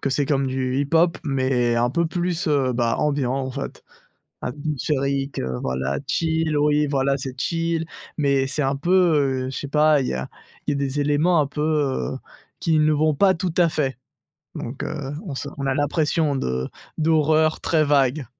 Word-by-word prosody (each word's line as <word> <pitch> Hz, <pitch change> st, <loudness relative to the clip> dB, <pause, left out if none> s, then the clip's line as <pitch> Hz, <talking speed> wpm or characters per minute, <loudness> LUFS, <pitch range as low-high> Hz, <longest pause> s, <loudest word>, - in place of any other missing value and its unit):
que 135 Hz, -, -1 dB
c'est 140 Hz, +1 st, +1 dB
comme 135 Hz, -2 st, +1 dB
du 130 Hz, 0 st, -1 dB
hip 145 Hz, -, -1 dB
hop 170 Hz, +1 st, +4 dB
mais 130 Hz, -4 st, +1 dB
un 120 Hz, +1 st, +2 dB
peu 170 Hz, +5 st, +1 dB
plus, 175 Hz, -1 st, -2 dB
heu, 135 Hz, -4 st, +2 dB
bah, 120 Hz, -1 st, +1 dB
ambiant, 140 Hz, -4 st, 0 dB
en 135 Hz, -1 st, -2 dB
fait. -, -, -6 dB, 0.6 s
Atmosphérique, 140 Hz, 0 st, -2 dB
heu, 65 Hz, -1 st, -3 dB
voilà, 65 Hz, +1 st, -2 dB
chill, 160 Hz, -1 st, 0 dB
oui, 150 Hz, 0 st, +3 dB
voilà, 135 Hz, -1 st, +1 dB
c'est 130 Hz, 0 st, -6 dB
chill 165 Hz, -1 st, -1 dB, 0.3 s
mais 140 Hz, -2 st, +2 dB
c'est 145 Hz, +3 st, -2 dB
un 135 Hz, +1 st, +1 dB
peu, 160 Hz, +6 st, -2 dB, 0.5 s
heu -, -, -3 dB
je -, -, -5 dB
sais 140 Hz, -, -4 dB
pas, 150 Hz, 0 st, +4 dB
il -, -, -2 dB
y -, -, -1 dB
a 65 Hz, 0 st, -4 dB, 0.4 s
il -, -, +2 dB
y -, -, +1 dB
a -, -, -2 dB
des 140 Hz, +1 st, -2 dB
éléments 150 Hz, +4 st, +3 dB
un 145 Hz, -, +2 dB
peu, 150 Hz, -, -5 dB
heu, 145 Hz, -4 st, 0 dB, 0.4 s
qui 160 Hz, -2 st, +2 dB
ne 155 Hz, 0 st, +4 dB
vont 155 Hz, 0 st, +2 dB
pas 190 Hz, +4 st, +4 dB
tout 175 Hz, 0 st, -3 dB
à 175 Hz, -2 st, +5 dB
fait. 135 Hz, -6 st, -1 dB, 0.6 s
Donc 120 Hz, +3 st, -5 dB
heu, 145 Hz, -1 st, -4 dB
on 145 Hz, -7 st, -5 dB
se 140 Hz, -, -4 dB
on 140 Hz, -, -3 dB
a 135 Hz, -, +2 dB
l'impression 150 Hz, +1 st, +1 dB
de 65 Hz, -, -2 dB, 0.3 s
d'horreur 155 Hz, 0 st, +2 dB
très 155 Hz, -2 st, +2 dB
vague. 140 Hz, -1 st, +2 dB
145 Hz, 195 wpm, -23 LUFS, 135-155 Hz, 0.6 s, à